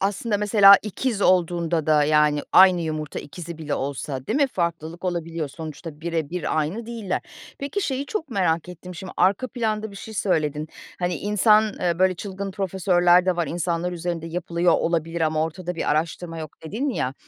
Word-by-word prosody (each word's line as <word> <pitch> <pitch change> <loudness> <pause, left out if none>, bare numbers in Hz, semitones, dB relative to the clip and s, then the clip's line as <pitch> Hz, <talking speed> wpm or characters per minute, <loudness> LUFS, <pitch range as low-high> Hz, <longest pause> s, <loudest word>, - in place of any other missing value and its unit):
Aslında 205 +3 0
mesela 205 -1 +7
ikiz 215 +1 -2
olduğunda 170 -3 +2
da, 150 -1 +4
yani, 150 -1 +3
aynı 185 -2 +7
yumurta 155 -2 -4
ikizi 165 +3 -8
bile 150 -2 -3
olsa 135 -1 -4
değil 225 - 0
mi, 285 -1 +4
farklılık 170 -4 -3
olabiliyor. 165 -3 -2
Sonuçta 155 +1 -8
birebir 165 0 -2
aynı 180 +10 -2
değiller. 225 -6 -3 0.4
Peki, 285 +9 -3
şeyi 275 -3 -2
çok 345 -9 -4
merak 180 -5 0
ettim 180 +1 -9
şimdi, 185 +2 -8
arka 200 +7 +2
planda 220 -3 -2
bir 200 - -11
şey 220 +2 -9
söyledin. 155 -6 0 0.3
Hani, 175 0 -1
insan, 210 +3 +4 0.2
eee, 175 -1 0
böyle 185 0 +3
çılgın 195 +1 -5
profesörler 180 -2 +3
de 185 -2 +2
var. 170 -3 0
"İnsanlar 170 +2 -2
üzerinde 170 -1 -4
yapılıyor 170 0 0
olabilir 165 0 0
ama 155 -1 +1
ortada 175 +2 -4
bir 165 - -1
araştırma 165 +2 -2
yok." 155 -2 -6
dedin 220 - -2
ya, 130 - -2
175 Hz, 170 wpm, -23 LUFS, 160-195 Hz, 0.4 s, mesela